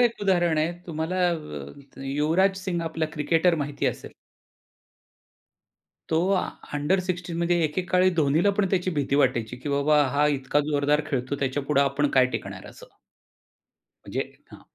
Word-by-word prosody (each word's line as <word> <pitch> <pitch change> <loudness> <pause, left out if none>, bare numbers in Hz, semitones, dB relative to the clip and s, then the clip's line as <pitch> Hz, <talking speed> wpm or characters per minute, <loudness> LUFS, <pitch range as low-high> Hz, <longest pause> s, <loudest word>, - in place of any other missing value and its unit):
एक 235 -3 +2
उदाहरण 175 -5 +2
आहे 160 +3 +1
तुम्हाला 160 +2 -3
अ, 135 - -8
युवराज 160 +8 +2
सिंग 175 -3 -1
आपला 160 -1 -2
क्रिकेटर 165 +3 +2
माहिती 145 0 -3
असेल. - - -4 2.0
तो 160 - +2
आ 190 - +3 0.3
अंडर 150 +7 +1
16 180 -2 -4
मध्ये 170 0 +2
एके 155 +4 -1
काळी 185 0 +4
धोनीला 160 +4 +3
पण 205 -3 +2
त्याची 185 -1 +1
भीती 145 -4 -1
वाटायची, 125 -4 +1
की 130 +4 -7
बाबा 145 +1 +3
हा 145 +1 +4
इतका 145 0 +1
जोरदार 145 +1 +2
खेळतो. 130 +1 -1
त्याच्यापुढे 140 +1 0
आपण 140 +1 +1
काय 130 -1 +6
टिकणार? - - -6
असं. - - -14 1.2
म्हणजे - - -3 0.3
हां, - - -13
150 Hz, 145 wpm, -25 LUFS, 140-175 Hz, 2.0 s, काय